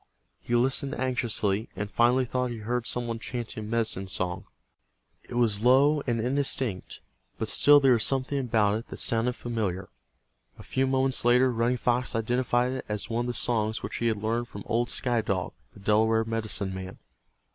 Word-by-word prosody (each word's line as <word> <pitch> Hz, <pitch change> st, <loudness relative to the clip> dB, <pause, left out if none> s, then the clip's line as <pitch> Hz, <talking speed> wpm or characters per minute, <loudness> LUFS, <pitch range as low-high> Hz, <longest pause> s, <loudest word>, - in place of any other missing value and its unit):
He 120 Hz, -, -2 dB
listened 135 Hz, +3 st, +1 dB
anxiously, 115 Hz, -5 st, -1 dB
and 100 Hz, +3 st, -3 dB
finally 125 Hz, +2 st, +3 dB
thought 125 Hz, +1 st, -1 dB
he 120 Hz, -, -5 dB
heard 120 Hz, +2 st, -3 dB
some 120 Hz, 0 st, +1 dB
one 115 Hz, -1 st, -4 dB
chanting 115 Hz, -2 st, -5 dB
a -, -, -7 dB
medicine 110 Hz, -4 st, -1 dB
song. 90 Hz, -2 st, -2 dB, 0.8 s
It 120 Hz, -, -6 dB
was 110 Hz, -3 st, +1 dB
low 140 Hz, +4 st, +5 dB
and 120 Hz, -2 st, 0 dB
indistinct, 125 Hz, -4 st, -1 dB, 0.4 s
but 110 Hz, -, -3 dB
still 145 Hz, +5 st, +6 dB
there 135 Hz, -2 st, +4 dB
was 115 Hz, -, +2 dB
something 135 Hz, +1 st, 0 dB
about 110 Hz, -4 st, +1 dB
it 115 Hz, -, -12 dB
that -, -, -8 dB
sounded 115 Hz, +2 st, +1 dB
familiar. 105 Hz, -7 st, -3 dB, 0.7 s
A -, -, -11 dB
few 130 Hz, 0 st, 0 dB
moments 130 Hz, 0 st, +1 dB
later 125 Hz, +2 st, +4 dB
Running 120 Hz, +1 st, 0 dB
Fox 125 Hz, 0 st, 0 dB
identified 120 Hz, +2 st, +1 dB
it 130 Hz, 0 st, -5 dB
as 105 Hz, +1 st, -3 dB
one 120 Hz, +1 st, -1 dB
of -, -, -4 dB
the 120 Hz, -, -3 dB
songs 110 Hz, -1 st, 0 dB
which -, -, -4 dB
he 120 Hz, -, 0 dB
had 110 Hz, -2 st, +1 dB
learned 115 Hz, +3 st, -2 dB
from 100 Hz, -4 st, -9 dB
old 120 Hz, +1 st, 0 dB
Sky 120 Hz, -3 st, 0 dB
Dog, 95 Hz, -4 st, -2 dB, 0.2 s
the -, -, -13 dB
Delaware 110 Hz, +2 st, +2 dB
medicine 110 Hz, -3 st, -2 dB
man. 95 Hz, 0 st, -7 dB
120 Hz, 185 wpm, -27 LUFS, 110-125 Hz, 0.8 s, still